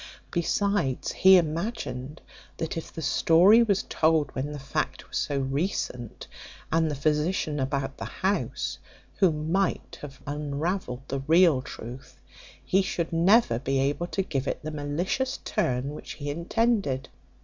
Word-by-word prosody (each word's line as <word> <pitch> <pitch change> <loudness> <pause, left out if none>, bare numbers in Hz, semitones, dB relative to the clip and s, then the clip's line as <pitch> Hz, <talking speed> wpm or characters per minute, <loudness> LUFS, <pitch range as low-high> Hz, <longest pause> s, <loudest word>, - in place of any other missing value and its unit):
Besides, 180 -5 0
he 190 0 +7
imagined 155 - -3 0.4
that 160 - -3
if 165 - -6
the 160 - -6
story 175 - +6
was 205 -4 +2
told 155 -2 +1
when 135 +3 -3
the 150 - -5
fact 135 0 -3
was - - -2
so 140 - -1
recent, 135 - -2 0.5
and 160 0 +2
the 150 - -2
physician 150 +2 0
about 135 0 -2
the - - -4
house, 195 +2 -2 0.4
who 190 -4 +4
might 160 +6 -1
have 140 -3 -9
unravelled 145 -1 -3
the 135 - -2
real 160 0 +4
truth, 125 +1 -10 0.5
he 190 - +3
should 170 -3 -2
never 170 - +4
be 135 +1 -1
able 145 +6 0
to 195 - -1
give 135 -6 -3
it - - -3
the 155 - -4
malicious 170 - -2
turn 130 +3 -1
which - - -8
he 145 0 -4
intended. 170 - 0
155 Hz, 145 wpm, -27 LUFS, 135-180 Hz, 0.5 s, he